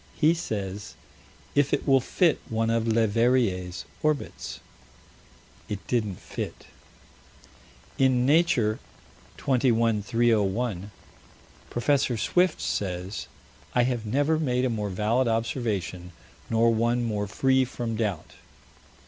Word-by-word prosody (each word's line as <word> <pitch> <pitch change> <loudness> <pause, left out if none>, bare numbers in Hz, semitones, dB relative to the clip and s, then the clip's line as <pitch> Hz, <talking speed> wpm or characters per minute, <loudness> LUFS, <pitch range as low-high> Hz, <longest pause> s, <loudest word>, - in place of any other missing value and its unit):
He 160 +1 +4
says: 105 - -5 0.6
"If 145 -1 +2
it - - -7
will 135 -1 +6
fit 165 +5 +2
one 115 0 0
of 115 0 0
Leverrier's 110 -4 +1 0.2
orbits" 155 -2 -2 1.1
It 100 -1 -5
didn't 110 -6 -1
fit. - - -6 1.3
In 130 -2 +3
Nature, 140 -8 +3 0.6
21 115 -4 +2
301, 110 -2 +1 0.8
Prof. 125 -1 +1
Swift 180 - +2
says: 95 0 -3 0.5
"I 125 - +5
have 120 -2 -1
never 145 +8 +1
made 125 -4 +1
a 125 - 0
more 105 -2 -2
valid 110 +6 +1
observation, 105 -6 -2 0.4
nor 115 0 +3
one 120 +2 +1
more 105 -3 -1
free 130 +5 +2
from 120 -2 -4
doubt." 95 -8 -2
115 Hz, 105 wpm, -26 LUFS, 105-130 Hz, 1.3 s, will